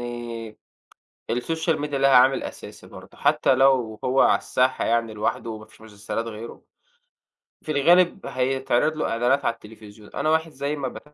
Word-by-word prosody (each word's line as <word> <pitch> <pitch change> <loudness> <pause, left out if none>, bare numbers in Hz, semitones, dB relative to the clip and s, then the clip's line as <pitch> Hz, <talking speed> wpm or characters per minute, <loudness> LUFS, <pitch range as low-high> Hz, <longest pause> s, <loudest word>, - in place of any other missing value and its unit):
آآ 120 -2 -7 0.8
الsocial 160 +6 -1
media 150 0 -4
لها 135 0 +3
عامل 130 +2 +5
أساسي - - -9
برضو، - - -14
حتى - - +2
لو 130 -5 +2
هو 130 +1 +2
على - - +5
الساحة 130 +1 0
يعني 115 -1 0
لوحده 110 +2 -2
وما 110 -1 -8
فيش 110 - -22
مسلسلات 110 +1 -5
غيره، 115 +1 -9 1.0
في 155 - -5
الغالب 175 +6 +3
هيتعرض 135 +3 0
له 155 - -2
إعلانات 120 +4 +1
على - - +2
التليفزيون، 105 -1 -15
أنا 155 - -1
واحد 160 +1 +1
زي 140 +1 -3
ما 140 -3 -3
ب - - -8
125 Hz, 160 wpm, -24 LUFS, 115-140 Hz, 1.0 s, عامل